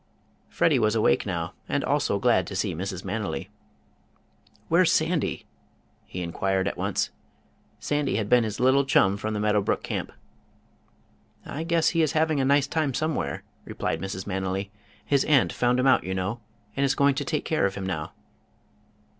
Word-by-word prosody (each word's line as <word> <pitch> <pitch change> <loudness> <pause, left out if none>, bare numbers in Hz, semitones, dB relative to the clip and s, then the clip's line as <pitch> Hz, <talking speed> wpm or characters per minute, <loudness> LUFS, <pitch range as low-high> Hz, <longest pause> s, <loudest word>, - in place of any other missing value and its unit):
Freddie 150 -6 +2
was 110 -1 +2
awake 110 -1 +2
now, 85 -3 -3 0.2
and - - 0
also - - +1
glad - - +2
to - - -6
see - - -1
Mrs. 95 +2 -5
Manily. 105 +2 -3 1.2
"Where's - - +4
Sandy?" - - 0 0.6
he 90 - -5
inquired 95 +2 -1
at - - -2
once. - - -1 0.7
Sandy 145 -1 -1
had 105 -2 -1
been 125 +2 +4
his 110 -2 -4
little 130 +2 +4
chum 100 -7 +3
from 110 +1 -3
the - - -2
Meadow 105 0 +2
Brook - - -1
Camp. - - -4 1.3
"I 155 - -5
guess 165 -1 +2
he 165 - +1
is 155 -1 +1
having 155 -2 +2
a 135 - +2
nice 140 +1 +4
time 145 -2 -1
somewhere," 155 - -2 0.2
replied 80 0 -3
Mrs. 95 0 -5
Manily. 95 0 -3 0.3
"His 140 -2 +2
aunt 140 -5 +3
found 125 +1 +1
him 125 - +1
out, 135 - +4
you 95 0 -3
know, 95 +5 -2 0.4
and 140 - 0
is 135 - +2
going 140 0 +4
to 145 +2 -2
take 150 +1 -2
care 155 -10 +2
of 95 - -6
him 95 - -4
now." 80 -5 -4
110 Hz, 175 wpm, -26 LUFS, 95-140 Hz, 1.3 s, Where's